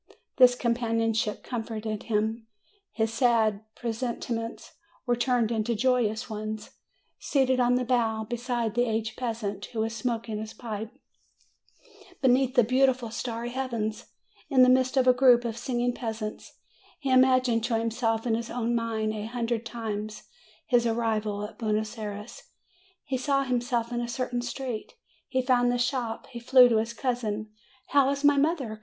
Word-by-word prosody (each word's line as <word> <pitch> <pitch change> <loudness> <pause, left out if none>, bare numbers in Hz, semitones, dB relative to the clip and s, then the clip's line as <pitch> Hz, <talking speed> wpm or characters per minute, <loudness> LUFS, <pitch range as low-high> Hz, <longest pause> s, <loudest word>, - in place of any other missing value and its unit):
This 250 -1 +7
companionship 230 -2 0
comforted 220 -3 -4
him; 220 +1 -1 0.4
his 225 -1 -1
sad 225 -4 +2
pre 235 -2 -3
sentiments 230 -1 -4 0.3
were 245 -2 +2
turned 240 -2 +1
into 230 +1 0
joyous 240 -1 +1
ones. 215 -1 -5 0.5
Seated 260 -2 +1
on 245 0 +3
the 250 0 0
bow, 225 -3 +1
beside 240 -1 -2
the 245 +1 +2
aged 220 0 -2
peasant, 220 -5 -3
who 225 - -4
was 225 +1 -2
smoking 230 -2 -2
260 220 +2 -11
MAY - - -4
his 220 - -4
pipe, - - -32 1.2
beneath 260 0 +3
the 245 - +6
beautiful 255 0 +2
starry 235 0 -4
heaven, 240 -4 -2 0.6
in 260 -3 +6
the 255 - +6
midst 260 +1 +3
of 260 - +4
a 255 - +6
group 250 -2 +5
of 230 -2 -2
singing 245 0 -1
peasants, 220 -3 -5 0.4
he 275 -2 -2
imagined 255 -3 +4
to 235 -2 +1
himself 225 0 -1
in 235 - +1
his 230 +1 -2
own 240 -1 -1
mind 225 -2 -1
a 215 0 -4
hundred 235 -1 -2
times 215 -2 -5 0.4
his 240 -1 +3
arrival 220 -3 -1
at 210 - -11
Buenos 215 0 -1
Ay 215 - -3
res; 205 +2 -8 0.6
he 260 -1 -2
saw 275 +1 +1
himself 245 -2 -1
in 240 0 -1
a 240 - -3
certain 245 0 -2
street; 245 - -5 0.3
he 260 -1 0
found 245 -1 +3
the 245 - 0
shop, 245 -2 -1
he 240 - -6
flew 250 +1 +7
to 230 - +3
his 225 +2 -1
cousin. 220 -4 -2 0.4
"How 275 -1 +4
is 280 +1 -2
my 290 0 +5
mother? 275 -7 0
235 Hz, 165 wpm, -27 LUFS, 220-250 Hz, 1.2 s, This